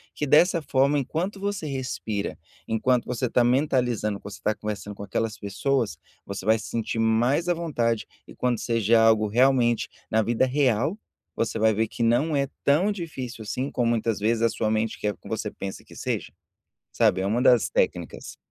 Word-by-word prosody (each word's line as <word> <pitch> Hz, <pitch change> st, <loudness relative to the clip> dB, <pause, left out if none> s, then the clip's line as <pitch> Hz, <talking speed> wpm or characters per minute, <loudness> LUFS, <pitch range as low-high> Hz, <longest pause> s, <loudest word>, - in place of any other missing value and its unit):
que 150 Hz, -, -2 dB
dessa 165 Hz, +4 st, +4 dB
forma 140 Hz, +1 st, +2 dB
enquanto 165 Hz, +9 st, -2 dB
você 200 Hz, -5 st, -3 dB
respira, 125 Hz, -6 st, -3 dB, 0.3 s
enquanto 120 Hz, +2 st, +1 dB
você 125 Hz, 0 st, -2 dB
tá 120 Hz, -, +3 dB
mentalizando, 125 Hz, -5 st, +1 dB
você 100 Hz, -, -8 dB
está 110 Hz, -, 0 dB
conversando 105 Hz, -1 st, -5 dB
com 100 Hz, -, -8 dB
aquelas 110 Hz, +2 st, -2 dB
pessoas, 105 Hz, -, -1 dB, 0.3 s
você 100 Hz, -1 st, -6 dB
vai 110 Hz, +1 st, +4 dB
se 110 Hz, -, -8 dB
sentir 115 Hz, 0 st, -2 dB
mais 120 Hz, +9 st, +2 dB
à -, -, +4 dB
vontade 120 Hz, -10 st, -1 dB, 0.2 s
e -, -, -13 dB
quando 125 Hz, -1 st, 0 dB
seja 115 Hz, -1 st, +2 dB
algo 110 Hz, -1 st, +4 dB
realmente 120 Hz, +1 st, +3 dB, 0.2 s
na 110 Hz, 0 st, +2 dB
vida 120 Hz, +3 st, +2 dB
real, 135 Hz, -, +1 dB, 0.4 s
você 115 Hz, -, -1 dB
vai 110 Hz, 0 st, +4 dB
ver 110 Hz, +1 st, 0 dB
que -, -, -7 dB
não 120 Hz, +7 st, +2 dB
é 140 Hz, -1 st, +1 dB, 0.2 s
tão 175 Hz, +9 st, +3 dB
difícil 130 Hz, -, -6 dB
assim 130 Hz, +6 st, -3 dB
como 120 Hz, -4 st, 0 dB
muitas 115 Hz, -2 st, 0 dB
vezes 110 Hz, +2 st, +1 dB
a 115 Hz, -, +5 dB
sua 110 Hz, -1 st, -1 dB
mente 110 Hz, 0 st, -1 dB
quer 105 Hz, 0 st, -1 dB
que -, -, -15 dB
você -, -, -3 dB
pensa 95 Hz, -1 st, -7 dB
que -, -, -17 dB
seja, -, -, -3 dB, 0.6 s
sabe, -, -, +3 dB
é 95 Hz, -, -1 dB
uma 110 Hz, +5 st, +1 dB
das 125 Hz, -3 st, +4 dB
técnicas. -, -, -2 dB
120 Hz, 185 wpm, -25 LUFS, 110-135 Hz, 0.6 s, a